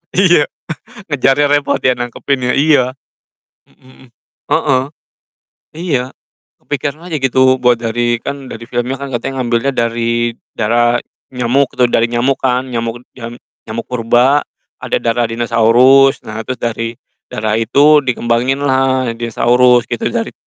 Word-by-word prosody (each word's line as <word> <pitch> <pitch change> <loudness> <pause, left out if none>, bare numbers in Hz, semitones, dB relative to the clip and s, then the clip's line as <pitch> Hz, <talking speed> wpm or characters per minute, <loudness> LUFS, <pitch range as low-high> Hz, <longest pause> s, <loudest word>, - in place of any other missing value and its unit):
Iya 175 -5 +4 0.6
ngejarnya 145 +1 +2
repot 145 0 +1
ya 130 -1 +3
nangkepinnya, 125 +1 -2
iya. 140 -4 +3 0.7
Mhm - - -30
hmm. 130 - -18 0.5
Heeh. 135 -5 +2 0.9
Iya 155 -8 -1 0.5
kepikiran 145 +4 -5
aja 165 - -2
gitu 130 0 +3
buat 120 -1 +3
dari 120 +1 -1
kan 140 -1 -6
dari 115 +1 -8
filmnya 125 +2 -3
kan 140 - -6
katanya 130 +3 -3
ngambilnya 120 +3 0
dari 115 -1 -1 0.2
darah 120 +2 +2 0.3
nyamuk 125 +2 0
tuh, 125 - +5
dari 115 - +2
nyamuk 125 +3 0
kan, 130 0 0
nyamuk 120 0 -4
jam 120 -1 -8 0.3
nyamuk 115 +1 -4
purba, 125 +4 +2 0.4
ada - - -2
darah 115 0 0
dinosaurus, 120 +4 +4
nah 110 +1 -6
terus 130 +3 -5
dari 115 0 -3 0.3
darah 110 0 -2
itu 145 +6 +4
dikembanginlah 130 +1 0
dinosaurus 120 +1 +2
gitu - - -2
dari - - -3
125 Hz, 130 wpm, -15 LUFS, 115-135 Hz, 0.9 s, tuh